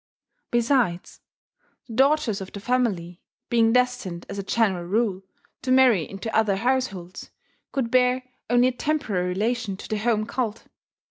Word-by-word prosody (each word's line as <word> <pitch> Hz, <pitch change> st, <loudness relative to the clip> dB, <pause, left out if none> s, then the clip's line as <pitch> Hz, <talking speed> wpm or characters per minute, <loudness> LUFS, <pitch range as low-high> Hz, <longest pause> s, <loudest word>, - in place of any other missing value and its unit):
Besides, 235 Hz, -7 st, 0 dB, 0.6 s
the 230 Hz, -, -10 dB
daughters 265 Hz, -4 st, +2 dB
of 190 Hz, -, -7 dB
the 200 Hz, -, -7 dB
family, 200 Hz, -7 st, -1 dB, 0.3 s
being 230 Hz, -1 st, +4 dB
destined, 250 Hz, -8 st, 0 dB
as 200 Hz, -, -5 dB
a -, -, -3 dB
general 195 Hz, -4 st, +1 dB
rule, 200 Hz, 0 st, 0 dB, 0.4 s
to 255 Hz, -, -2 dB
marry 255 Hz, -10 st, +4 dB
into 195 Hz, +3 st, -5 dB
other 215 Hz, -3 st, +3 dB
households, 200 Hz, -6 st, -2 dB, 0.4 s
could 255 Hz, -4 st, -2 dB
bear 255 Hz, 0 st, +3 dB, 0.3 s
only 245 Hz, +1 st, +4 dB
a -, -, -2 dB
temporary 245 Hz, -9 st, -1 dB
relation 210 Hz, +1 st, -1 dB
to -, -, -9 dB
the 215 Hz, -, -2 dB
home 215 Hz, -1 st, +1 dB
cult. 230 Hz, -2 st, -3 dB
225 Hz, 145 wpm, -24 LUFS, 195-250 Hz, 0.6 s, being